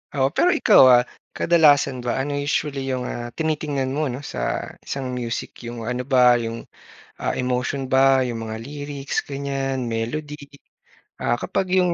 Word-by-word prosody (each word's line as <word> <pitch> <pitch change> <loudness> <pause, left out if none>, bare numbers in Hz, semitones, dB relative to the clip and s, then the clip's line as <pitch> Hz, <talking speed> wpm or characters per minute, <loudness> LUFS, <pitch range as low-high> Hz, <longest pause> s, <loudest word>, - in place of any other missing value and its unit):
Oo, 135 -1 +3
pero 355 - +4
ikaw, - - +6
ah, 120 0 +6 0.3
kadalasan 145 -5 +4
ba 120 - -1
ano 140 +2 -2 0.2
usually 145 -1 -1
yung, 130 -1 -2
ah, 120 0 -5
tinitingnan 150 -4 -1
mo 155 - +1
'no 125 - -5
sa - - -5 0.5
isang 135 -2 -4
music? 115 -1 -4 0.2
Yung 120 0 -6
ano 125 0 -2
ba 130 - +5 0.3
yung, 115 0 -4 0.6
ah, - - -1
emotion 125 +2 -1
ba, 130 - +5 0.3
'yong 120 -2 -4
mga 110 0 -5
lyrics, 145 0 -6
ganyan 135 -2 -2
melody? 130 +7 -3 0.9
Ah, 120 - +1
kapag 195 +9 -2
yung 180 -2 +3
135 Hz, 155 wpm, -22 LUFS, 125-145 Hz, 0.9 s, ikaw